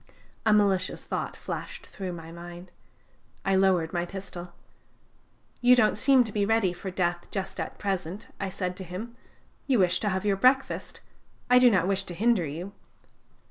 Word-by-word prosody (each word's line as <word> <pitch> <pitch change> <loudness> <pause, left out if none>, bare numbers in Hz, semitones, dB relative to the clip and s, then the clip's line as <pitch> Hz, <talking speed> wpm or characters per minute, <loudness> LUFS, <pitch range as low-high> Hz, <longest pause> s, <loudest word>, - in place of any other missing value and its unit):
A - - +6
malicious 200 -3 +2
thought - - -3
flashed - - -6
through 185 -2 -6
my 165 -1 -9
mind. 175 +1 -10 0.7
I 195 - +3
lowered 185 -4 +3
my 175 -1 0
pistol. 180 -1 -8 1.1
"'You 245 +1 +7
don't 220 -4 +3
seem 260 +3 +5
to 220 - -6
be 205 0 0
ready 205 -3 +2
for 190 - -6
death 175 -2 -1
just 190 -1 -4
at - - -4
present,' 190 -1 -3
I 195 - -2
said 180 -1 -3
to 190 - -6
him: 195 +7 -7 0.5
'you 265 -3 +3
wish 180 -2 +3
to 210 - 0
have 190 +1 -2
your 200 -2 +2
breakfast; 260 +5 +1 0.5
I 250 - +8
do 250 -1 +7
not 185 -5 +2
wish 195 0 +1
to 175 - -6
hinder 215 -4 +2
you.' 170 +7 -6
190 Hz, 175 wpm, -27 LUFS, 180-210 Hz, 1.1 s, I